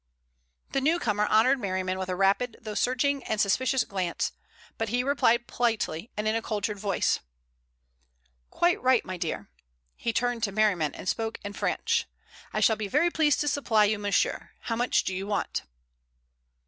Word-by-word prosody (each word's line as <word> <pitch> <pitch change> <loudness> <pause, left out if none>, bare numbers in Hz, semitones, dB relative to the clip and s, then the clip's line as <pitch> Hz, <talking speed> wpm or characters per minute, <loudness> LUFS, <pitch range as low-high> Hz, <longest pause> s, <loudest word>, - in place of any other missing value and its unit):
The 275 - 0
newcomer 235 -9 +1
honored 255 +6 +4
Merriman 185 -3 -2
with 185 0 -4
a 185 - -1
rapid 200 +5 +1
though 215 -2 -6
searching 255 +5 +1
and 215 - -1
suspicious 255 +6 +2
glance, 185 -3 -2 0.5
but 225 -1 -1
he 245 +3 +1
replied 245 -4 +2
politely, 225 -7 -1
and 210 +1 -1
in 215 - +2
a 225 - 0
cultured 210 -2 -3
voice: 195 -2 +1 1.3
"Quite 345 0 +1
right, 255 -2 +3
my 185 - -5
dear." 170 -2 -4 0.4
He 230 - -2
turned 245 0 0
to 215 -3 0
Merriman 195 -8 +1
and - - -8
spoke 225 +2 -1
in 205 0 -5
French. - - 0 0.4
"I - - -1
shall 220 - +4
be 215 -2 -3
very 300 - +2
pleased 305 -3 +2
to 295 - -1
supply 225 -7 +3
you, 210 0 0
monsieur. 205 -1 0
How 230 - -2
much 245 +2 +2
do 190 - -2
you 190 +2 -4
want?" 205 -1 -1
220 Hz, 170 wpm, -27 LUFS, 200-250 Hz, 1.3 s, honored